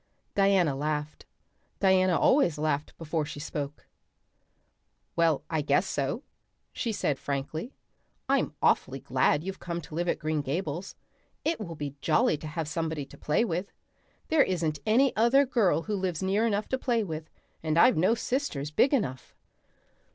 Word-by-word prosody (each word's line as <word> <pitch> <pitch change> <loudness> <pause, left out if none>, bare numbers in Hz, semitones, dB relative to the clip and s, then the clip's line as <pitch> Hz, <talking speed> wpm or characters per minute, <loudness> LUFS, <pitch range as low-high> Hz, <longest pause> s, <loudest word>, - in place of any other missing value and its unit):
Diana 195 -7 +3
laughed. 150 +1 -3 0.5
Diana 185 -2 +4
always 255 - +4
laughed 150 -1 -1
before 160 -1 -2
she 145 - -7
spoke. 145 -1 -5 1.3
"Why, 165 -3 +3
I 160 -2 0
guess 145 +6 +2
so," 145 - -2 0.5
she 235 - -2
said 145 -9 -1
frankly. 145 - -4 0.5
"I'm - - +1
awfully - - +2
glad 145 - +1
you've 190 +1 -5
come 170 -1 -4
to 155 - -12
live 175 +2 -1
at - - +1
Green 155 -1 -1
Gables. 160 +5 -3 0.5
It 325 +1 +1
will 170 -6 -6
be 145 -2 -6
jolly 245 - +3
to 155 - -8
have 155 0 -3
somebody 160 -2 -2
to - - -15
play 150 +10 +1
with. 180 0 -3 0.6
There 315 -2 +5
isn't 165 - 0
any 255 +5 +4
other 240 +6 +5
girl 220 -10 +2
who 215 - -2
lives 185 -3 -2
near 200 +4 +2
enough 205 -1 0
to 260 - -1
play 235 -4 +1
with, 160 -4 -6 0.3
and 155 0 0
I've 250 +9 +6
no 185 +8 +3
sisters 230 - -2
big 270 - +4
enough." 130 - -3
170 Hz, 160 wpm, -28 LUFS, 150-210 Hz, 1.3 s, I've